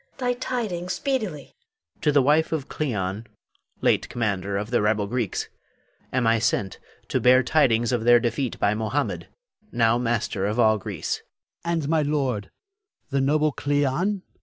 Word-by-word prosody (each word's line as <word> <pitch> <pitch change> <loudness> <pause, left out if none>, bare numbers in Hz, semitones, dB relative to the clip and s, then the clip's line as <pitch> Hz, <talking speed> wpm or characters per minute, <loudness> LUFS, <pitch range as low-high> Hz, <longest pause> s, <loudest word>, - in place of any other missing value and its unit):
Thy 250 -2 0
tidings 215 -8 -3
speedily! 215 - -2
Hafiz. 455 -2 -44
To 150 - +3
the 145 -1 +4
wife 150 +4 +3
of 155 -4 -2
Cleon, 105 -6 -3 0.5
late - - +2
commander 100 -4 -1
of 105 +3 -4
the 120 - +2
rebel 105 0 +1
Greeks, 115 -2 -2 0.6
am 125 -2 +1
I 115 0 +3
sent 100 -4 -1 0.3
to - - +1
bear 130 +1 +6
tidings 120 -5 +2
of 120 -3 0
their 120 +1 +6
defeat 120 +2 -2
by 100 - +2
Mohammed, 110 +7 -2 0.4
now 115 0 +3
master 115 -4 -1
of 105 +3 -2
all 110 -2 +4
Greece. - - -3 0.5
Adrastus. 170 - -2
And 140 - -3
my 160 -1 +3
lord, 135 -8 -1 0.6
the 135 0 +1
noble 150 +2 +2
Cleon? 145 +8 0
125 Hz, 160 wpm, -24 LUFS, 110-155 Hz, 0.6 s, bear